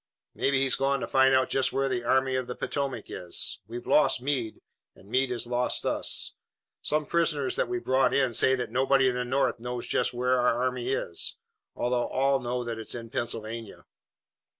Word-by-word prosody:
"Maybe 140 -1 +1
he's 135 0 +3
gone 135 0 +1
to - - -3
find 130 0 +4
out 130 0 +2
just 130 -1 +2
where 135 0 0
the 125 -2 -1
Army 130 +2 +2
of 130 -1 -2
the 125 - -5
Potomac 135 -5 -3
is. 90 -1 -2
We've 120 +2 -7
lost 150 - +4
Meade, 125 -4 -2 0.3
and 95 - -18
Meade 130 +4 +1
has 125 -1 -2
lost 125 +1 0
us. - - 0 0.5
Some 150 0 0
prisoners 150 -6 0
that - - 0
we've 365 0 -4
brought 130 +1 +3
in 130 -3 +2
say 130 +4 +4
that 125 -3 -4
nobody 135 +1 +3
in - - -1
the 125 0 -1
North 130 0 0
knows 125 0 -5
just - - +1
where 125 +1 +1
our 120 -1 +2
army 125 0 -1
is, 85 -10 -2 0.4
although 120 0 0
all 135 +1 +1
know 125 0 -2
that 115 -1 -4
it's 110 - -4
in 115 -1 -8
Pennsylvania." 115 -1 -4
130 Hz, 195 wpm, -27 LUFS, 120-135 Hz, 0.5 s, find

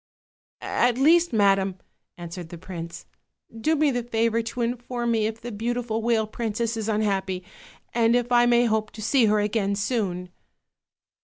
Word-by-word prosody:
"At 245 0 +1
least, 335 +5 +4
madam," 195 -3 +3 0.4
answered 175 -1 -8
the 175 - -8
prince, 170 -1 -8 0.5
"do 305 +8 +1
me 300 -1 +3
the 245 -1 -1
favor 230 -1 0
to 230 +2 -5
inform 240 0 -2
me 220 -2 +2
if 220 0 -7
tfce 240 -3 -6
beautiful 235 -1 -1
whale 225 -1 +2
princess 230 +1 -2
is 220 -1 -3
unhappy; 195 -3 -1 0.5
and 230 0 +3
if 245 0 0
I 240 0 +5
may 240 0 +4
hope 215 -1 0
to 220 - -9
see 255 +1 +3
her 210 0 +3
again 205 -1 0
soon." 195 -5 -2
225 Hz, 160 wpm, -25 LUFS, 205-240 Hz, 0.5 s, I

